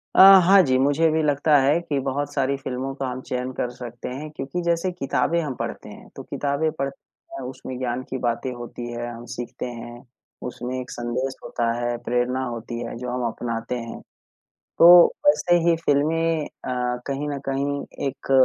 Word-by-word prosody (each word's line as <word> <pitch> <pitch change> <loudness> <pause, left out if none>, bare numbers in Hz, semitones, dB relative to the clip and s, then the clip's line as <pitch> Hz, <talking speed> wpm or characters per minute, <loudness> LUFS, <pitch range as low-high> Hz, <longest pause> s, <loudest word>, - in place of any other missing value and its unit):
अ, - - +8 0.3
हाँ 195 +1 +8
जी, 130 -3 +2
मुझे 145 +4 +3
भी 160 0 +2
लगता 145 +1 +3
है 145 +5 +3
कि 150 -4 -2
बहुत 145 +2 -2
सारी 140 0 +1
फ़िल्मों 130 0 -4
को 135 - -3
हम 130 0 -4
चयन 125 0 -2
कर 125 - -2
सकते 120 0 -8
हैं 145 +5 -6
क्योंकि 135 +6 -3
जैसे 170 +2 +1
किताबें 145 0 0
हम 140 -5 -4
पढ़ते - - -5
हैं, - - -12
तो - - -8
किताबें 145 +2 -1
पढ़ते 140 0 -7
हैं 135 - -6
उसमें 130 0 -7
ज्ञान 125 0 -2
की 130 - -3
बातें 120 +2 -1
होती 120 0 -7
हैं, 120 0 -4
हम 115 +1 -10
सीखते 120 +1 -6
हैं, 120 0 -8 0.5
उसमें 125 +1 -5
एक 125 - -7
संदेश 125 +3 -3
होता 115 -1 -1
है, 120 0 -1
प्रेरणा 125 +2 0
होती 120 0 -5
है 115 - -6
जो 125 +1 -5
हम 125 -1 -1
अपनाते 115 +1 -3
हैं, 115 -1 -7 0.8
तो 175 +1 +10 0.2
वैसे 175 -11 +4
ही 165 - +4
फ़िल्में 160 +2 +2
अ, 125 -4 -3
कहीं 140 +1 -2
न 140 -1 -3
कहीं 140 +1 -1 0.3
एक 135 - -6
130 Hz, 185 wpm, -23 LUFS, 125-145 Hz, 0.8 s, तो